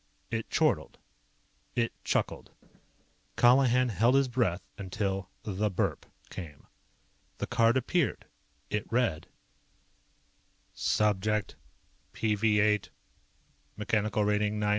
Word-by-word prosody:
It 115 -1 -3
chortled. - - +1 0.8
It 115 -1 0
chuckled. - - -1 0.9
Colihan 125 0 +5
held 115 +6 +3
his 135 -1 +4
breath 115 -8 -1
until 95 -1 -3
the 105 0 -1
BURP 95 - -1 0.3
came. 80 -6 -9 0.7
The - - -2
card 115 0 +3
appeared. 145 +5 0 0.5
It 105 -1 -3
read: 115 -10 0 1.5
"_Subject 105 0 +1 0.6
#PV8. 105 -1 +2 0.9
Mech. 105 +1 -6
Rat. 110 - +5
9987. 105 0 0
105 Hz, 90 wpm, -29 LUFS, 100-120 Hz, 1.5 s, Colihan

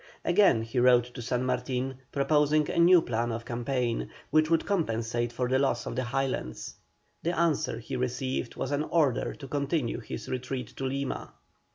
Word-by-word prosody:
Again 175 - +4
he 115 +2 -2
wrote 125 -1 +6
to 125 - -7
San 125 +1 -1
Martin, 125 +1 -2
proposing 150 +2 +2
a - - 0
new 170 0 +7
plan 120 0 -1
of 115 0 -4
campaign, 120 0 -1 0.2
which 155 +1 +4
would 165 -1 +2
compensate 120 - -1
for 125 +1 -1
the 130 +1 +2
loss 140 - +1
of - - -4
the 130 -1 -1
Highlands. 120 - -2 0.5
The 170 +2 -1
answer 165 -8 +1
he 115 +3 -6
received 125 0 -2
was - - -3
an 145 0 +1
order 150 -8 +1
to 135 - -9
continue 140 -2 -1
his 110 -1 -7
retreat 125 -2 -4
to 135 - -3
Lima. 135 +1 -3
130 Hz, 175 wpm, -28 LUFS, 120-145 Hz, 0.5 s, new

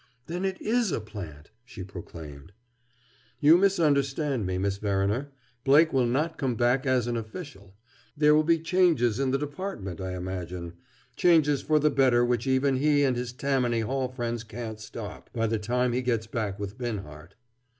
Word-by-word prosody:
"Then 175 +3 -3
it 190 -1 -2
is 230 -3 +1
a - - -1
plant!" 90 -9 -9
she 120 -6 -9
proclaimed. 85 -3 -10 0.9
"You 150 +4 +7
misunderstand 145 - +2
me, 90 0 -1
Miss 100 +1 -1
Verriner. 100 +6 -1 0.3
Blake 150 +4 +5
will 130 -2 +3
not 155 +7 -1
come 130 -4 0
back 125 +4 +1
as 130 -2 +2
an 120 0 -2
official. 110 - -8 0.4
There 150 0 +5
will 155 - +5
be 165 +1 +3
changes 160 - +2
in 135 -1 +1
the 135 - +2
Department, 145 - -5
I 95 -1 -4
imagine; 90 -1 -5 0.4
changes 150 -5 +4
for 155 +2 +2
the 150 0 +3
better 125 -3 +4
which 120 +1 0
even 130 0 +2
he 145 +1 +3
and 130 -3 +2
his 125 0 -3
Tammany 125 -3 0
Hall 130 +3 -1
friends 120 -2 -4
can't 110 0 -7
stop, 110 -1 -9
by 115 -2 0
the 110 0 0
time 125 +3 0
he 125 - 0
gets 115 -3 0
back 110 -3 -3
with 100 +3 -6
Binhart." 95 -10 -6
125 Hz, 170 wpm, -27 LUFS, 105-145 Hz, 0.9 s, You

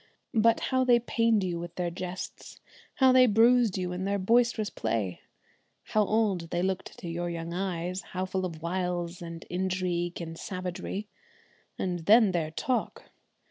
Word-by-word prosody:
But 230 0 +4
how 260 0 +4
they 245 -2 +5
pained 230 -3 +2
you 175 -2 -2
with 170 0 -7
their 175 -1 -2
jests; 180 +1 -7 0.4
how 260 -1 +5
they 255 0 +7
bruised 230 -1 +4
you 180 -1 -2
in 180 +1 -3
their 200 +1 0
boisterous 230 +2 +2
play; 100 -6 -2 0.6
how 215 - +2
old 200 -5 +1
they 175 +1 -1
looked 190 0 -3
to 175 - -6
your 175 +1 -3
young 170 0 -5
eyes; 180 0 -2
how 185 0 -4
full 185 0 -2
of 165 -3 -5
wiles 175 0 -2
and 165 -1 -7
intrigue 180 -1 -2
and 165 -1 -7
savagery! 185 +2 -5 0.7
And 180 -2 -2
then 215 -1 +7
their 165 -3 -1
talk! 245 +10 -3
185 Hz, 160 wpm, -28 LUFS, 175-215 Hz, 0.7 s, they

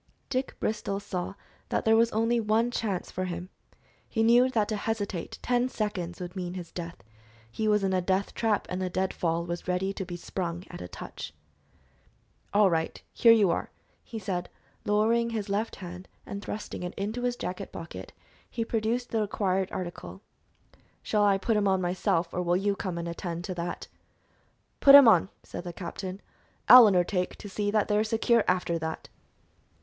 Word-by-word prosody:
Dick 260 0 -2
Bristol 200 -2 -2
saw 195 -1 -4 0.3
that - - -1
there 220 0 +5
was 230 +1 +4
only 230 +2 +2
one 225 +2 +1
chance 205 -7 -2
for 185 - -2
him. 180 0 -5 0.6
He 225 - +1
knew 240 +3 +5
that 220 -5 +1
to 215 - 0
hesitate 205 -4 -3
ten 245 0 +1
seconds 185 -7 -3
would 180 0 -7
mean 180 -1 -4
his 175 -3 -7
death. 170 - -7 0.5
He 215 - -2
was 210 -1 +3
in 190 -1 +1
a 185 - +2
death 190 +2 0
trap, 220 -3 0
and 180 +1 -3
the 185 - -1
dead 190 +1 -1
fall 170 0 -1
was 175 +1 -5
ready 185 +2 0
to 195 - -4
be 175 -1 -6
sprung 175 0 -4
at - - -8
a 90 - -6
touch. - - -8 1.2
"All 205 0 +5
right; 165 -3 -1
here 230 - +6
you 210 -6 +5
are!" - - -2 0.3
he 230 - -8
said, 185 -4 -3 0.4
lowering 225 +3 +2
his 220 -3 -3
left 210 +3 -1
hand, 180 0 -9 0.2
and 200 - -6
thrusting 210 - -5
it 180 0 -5
into 215 +5 -3
his 245 0 0
jacket 190 -3 -5
pocket, 165 - -8 0.4
he 230 - -3
produced 230 +2 -1
the 225 - +1
required 195 -2 0
article. 135 - -6 0.8
"Shall 210 -1 +1
I 200 -1 +4
put 215 +3 0
'em 205 -1 +2
on 190 -1 +3
myself, 175 -1 0
or 180 - -1
will 175 0 +2
you 200 +1 0
come 185 -4 -4
and 170 0 -4
attend 170 0 -4
to 185 - -4
that?" 175 0 -5 0.9
"Put 275 0 +9
'em 280 -3 +10
on," 215 -3 +5
said - - -7
the 175 - -5
captain. 185 +2 -6 0.4
"I'll 250 -3 +11
undertake 180 -1 +1
to - - -10
see 205 +1 -2
that 210 0 +2
they 210 - +1
are 210 - +3
secure 225 +1 +2
after 180 -2 +1
that." 160 0 -5
195 Hz, 185 wpm, -28 LUFS, 180-220 Hz, 1.2 s, I'll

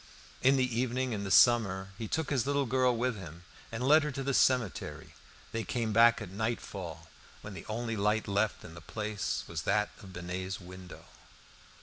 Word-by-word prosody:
In 135 +2 +5
the 130 - +3
evening 130 0 0
in 100 -2 -3
summer 95 -4 +5
he 110 +2 -5
took 160 +3 -2
his 135 -2 +1
little 140 0 +1
girl 125 -1 +2
with 125 0 0
him 85 -2 -10 0.3
and 120 +3 -2
led 155 +3 +7
her 150 - -2
to 135 +1 -3
the 140 +1 0
cemetery. 85 - +1 0.4
They 115 0 -2
came 115 -2 -2
back 115 +1 +6
at 95 - -9
nightfall, 100 -5 -4 0.3
when 105 - -8
the 95 - -9
only 115 +1 -2
light 105 +1 +1
left 100 +2 0
in 80 - -10
the 85 - -10
Place 105 +3 -3
was 80 -2 -4
that 105 +7 +1
in 100 - -11
Binet's 90 +1 -5
window. 90 -1 -11
110 Hz, 185 wpm, -31 LUFS, 95-125 Hz, 0.4 s, led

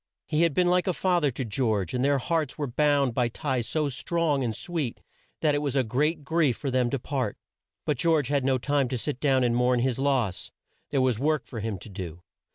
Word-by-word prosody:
He 155 0 0
had 170 -4 +2
been 180 - +3
like 180 +1 +2
a 185 - +2
fa 180 -2 +2
ther 145 - +3
to 130 0 -4
George, 110 -5 0
and 125 0 0
their 140 0 +3
hearts 155 +1 -1
were 150 - -1
bound 140 0 +2
by 120 0 +2
ties 130 -2 -2
so 155 -2 0
strong 145 +1 0
and 115 -3 -2
sweet 160 -9 -3 0.4
that 150 -2 +3
it 145 - +1
was 145 -2 -2
a 135 - +3
great 145 +7 0
grief 155 -4 +1
for 140 - -3
them 125 -1 +2
to 140 - -1
part. 130 -4 -3 0.5
But 150 - 0
George 155 -5 +2
had 140 -2 +1
no 135 0 +2
time 140 +1 +1
to 125 0 -2
sit 135 +2 -3
down 135 -3 +3
and 120 -1 +2
mourn 125 0 +3
his 130 0 0
loss. 130 -9 0 0.4
There 140 -2 +1
was 125 -4 +1
work 150 0 +1
for 115 - -7
him 110 -1 -3
to 95 - -11
do. 90 -3 -7
135 Hz, 235 wpm, -27 LUFS, 125-150 Hz, 0.5 s, been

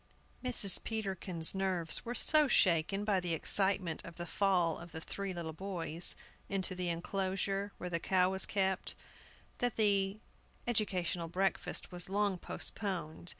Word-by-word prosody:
MRS. 235 -6 +6
PETERKIN'S 190 -6 0
nerves 185 -4 +2
were 240 +1 -5
so 305 +4 +4
shaken 190 -2 +2
by 205 -3 +1
the 175 -2 -2
excitement 190 -1 +4
of 170 - -12
the 175 - -5
fall 175 -2 0
of 170 -1 -12
the 160 - -5
three 195 +4 -5
little 170 -3 -6
boys 170 -2 -1 0.3
into 190 -2 -1
the 180 -1 -3
enclosure 195 +3 -3
where 180 - -6
the 170 -1 -2
cow 185 +1 +2
was 190 0 0
kept 190 -2 -1 0.6
that 245 -1 0
the 200 -2 +1 0.5
educational 185 -7 0
breakfast 190 +4 -2
was 175 0 -6
long 200 -2 -1
postponed. 175 -4 -4
190 Hz, 145 wpm, -32 LUFS, 170-200 Hz, 0.6 s, MRS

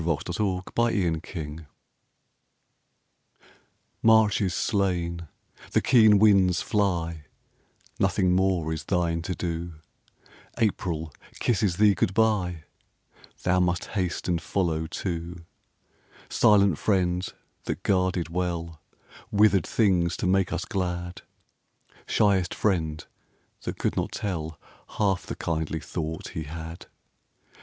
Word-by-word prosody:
GOD 80 -2 +1
SPEED 90 - -5
TO 95 -2 -1
THE 95 -9 +1
SNOW 80 -2 -7 2.4
March 110 -2 +5
is 95 -3 0
slain; 85 -5 -1 0.5
the - - +5
keen 110 -5 +6
winds 95 -4 +5
fly; 85 -6 -1 0.7
Nothing 90 -1 +2
more 90 -3 +1
is 80 -3 -6
thine 85 -3 0
to 90 +2 -4
do; 85 -1 -4 0.8
April 85 -9 -1 0.3
kisses 100 -6 +1
thee 105 -1 +5
good 95 0 -1
bye; 95 -7 +1 0.8
Thou 90 0 +2
must 90 -1 0
haste 90 -4 -2
and 85 -2 0
follow 80 -3 -1
too; 85 0 -5 0.8
Silent 100 -6 +4
friend 90 -3 0 0.3
that - - -4
guarded 90 -3 +1
well 85 -2 -3 0.5
Withered 105 -3 +3
things 90 -6 +2
to - - -3
make 95 0 +2
us - - -2
glad, 90 -2 -3 0.9
Shyest 95 -4 +2
friend 80 -7 -1 0.6
that - - -5
could - - -1
not - - -1
tell 80 -6 -4 0.4
Half 100 -3 +1
the - - -4
kindly 80 -1 -2
thought 80 0 -5
he 80 - -5
had. 80 +2 -8
90 Hz, 115 wpm, -26 LUFS, 85-100 Hz, 2.4 s, keen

